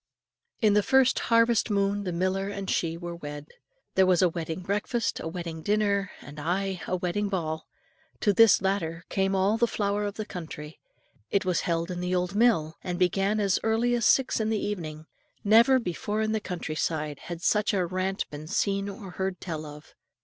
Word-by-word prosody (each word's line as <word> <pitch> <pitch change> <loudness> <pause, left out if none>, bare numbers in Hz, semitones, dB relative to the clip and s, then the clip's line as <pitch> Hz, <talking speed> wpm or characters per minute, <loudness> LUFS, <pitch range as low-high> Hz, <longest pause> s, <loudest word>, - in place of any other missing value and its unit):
In 215 -2 +5
the 210 - +5
first 265 +4 +4
harvest 230 0 +4
moon 200 0 0
the 180 - -1
miller 185 +3 0
and 200 -1 -5
she 165 -1 0
were 170 0 -7
married. 145 0 -6 0.5
There 190 0 +4
was 185 -1 +4
a 180 - +5
wedding 165 +1 -4
breakfast, 205 +5 -1
a - - -5
wedding 165 -1 -5
dinner, 200 0 +1
ay, - - -15
and 175 +6 -3
a 185 - 0
wedding 185 +3 -1
ball. 160 -5 -3 0.5
To 205 - +3
this 220 -1 +6
latter 170 -4 -1
came 195 0 +1
all 195 +3 +2
the 235 +1 +3
flower 205 -1 -1
of 205 0 -4
the 215 - -4
country; 160 -5 -8 0.5
it 200 -1 +1
was 180 -2 +1
held 170 +1 0
in 175 - -4
the 180 +1 -1
old 180 +1 -1
mill, 205 -8 +2
and 180 -1 -3
began 195 +4 +2
as 200 -3 +2
early 225 +2 +1
as 235 -2 +2
six 265 -3 +3
in 220 0 0
the 220 - +1
evening. 160 -6 -5 0.4
Never 230 +5 +6
before 210 0 -2
in 215 - 0
the 220 - +1
country 180 -6 -5
side 155 -2 -2
had 175 0 -6
such 210 +2 +2
a 190 -4 +1
rant 185 +2 -2
been 150 +1 -8
seen 200 +2 0
or 195 -1 -8
heard 190 0 -3
tell 155 -3 -5
of. 150 +1 -12
190 Hz, 195 wpm, -27 LUFS, 170-210 Hz, 0.5 s, this